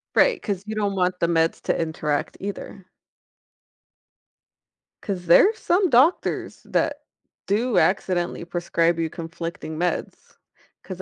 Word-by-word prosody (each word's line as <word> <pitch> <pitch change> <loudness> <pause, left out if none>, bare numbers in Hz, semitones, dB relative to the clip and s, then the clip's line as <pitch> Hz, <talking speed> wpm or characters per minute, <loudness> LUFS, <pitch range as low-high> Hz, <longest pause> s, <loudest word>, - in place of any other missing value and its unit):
Right, - - +4
'cause 200 -2 -3
you 220 - -4
don't 205 -2 -1
want 180 -1 0
the 170 - +3
meds 165 -1 +1
to - - 0
interact 155 -2 -2
either. 200 -1 -7 2.2
'Cause 185 -3 -4
there's 410 - +6
some 365 0 +2
doctors 265 +8 +2
that - - -1 0.5
do 210 0 +2
accidentally 175 -3 0
prescribe 170 -1 0
you 165 -1 0
conflicting 165 -1 -6
meds. 175 +2 -3 0.5
'Cause 190 -1 -7
180 Hz, 120 wpm, -23 LUFS, 170-205 Hz, 2.2 s, there's